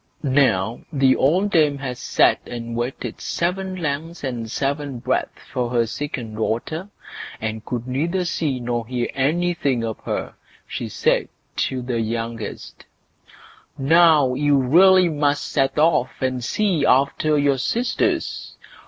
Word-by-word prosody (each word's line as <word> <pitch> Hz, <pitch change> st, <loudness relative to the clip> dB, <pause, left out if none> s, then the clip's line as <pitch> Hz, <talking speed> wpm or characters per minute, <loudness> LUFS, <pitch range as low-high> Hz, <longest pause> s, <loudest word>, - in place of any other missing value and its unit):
Now, 130 Hz, -6 st, +2 dB
when 145 Hz, -, -5 dB
the 130 Hz, -1 st, +5 dB
old 185 Hz, +9 st, +2 dB
dame 150 Hz, -5 st, +3 dB
had 135 Hz, -2 st, -4 dB
sat -, -, +2 dB
and 115 Hz, -1 st, -6 dB
waited 120 Hz, +3 st, -4 dB
seven 185 Hz, +2 st, -2 dB
lengths 165 Hz, 0 st, -4 dB
and 120 Hz, -4 st, -4 dB
seven 140 Hz, +1 st, -2 dB
breadths 120 Hz, -, -2 dB
for 125 Hz, -2 st, -1 dB
her 120 Hz, -1 st, +2 dB
second 120 Hz, -2 st, -5 dB
daughter, 155 Hz, -, -2 dB, 0.5 s
and 110 Hz, 0 st, -4 dB
could 120 Hz, -1 st, -4 dB
neither 170 Hz, +8 st, -1 dB
see 150 Hz, -6 st, -1 dB
nor 120 Hz, -2 st, -3 dB
hear 125 Hz, -1 st, -2 dB
anything 145 Hz, -3 st, 0 dB
of 110 Hz, -1 st, -4 dB
her, -, -, -4 dB, 0.3 s
she -, -, -5 dB
said -, -, +1 dB, 0.3 s
to 130 Hz, -2 st, -1 dB
the 120 Hz, -2 st, -1 dB
youngest: 115 Hz, -1 st, -5 dB, 0.9 s
"Now, 150 Hz, -2 st, +5 dB
you 145 Hz, +2 st, +2 dB
really 180 Hz, +8 st, +6 dB
must 145 Hz, -2 st, 0 dB
set 135 Hz, -2 st, +1 dB
off 150 Hz, -5 st, +3 dB
and 130 Hz, -2 st, -1 dB
see 185 Hz, -, 0 dB
after 140 Hz, +4 st, +3 dB
your 140 Hz, -2 st, +2 dB
sisters. 235 Hz, -, -1 dB
135 Hz, 135 wpm, -22 LUFS, 120-160 Hz, 0.9 s, really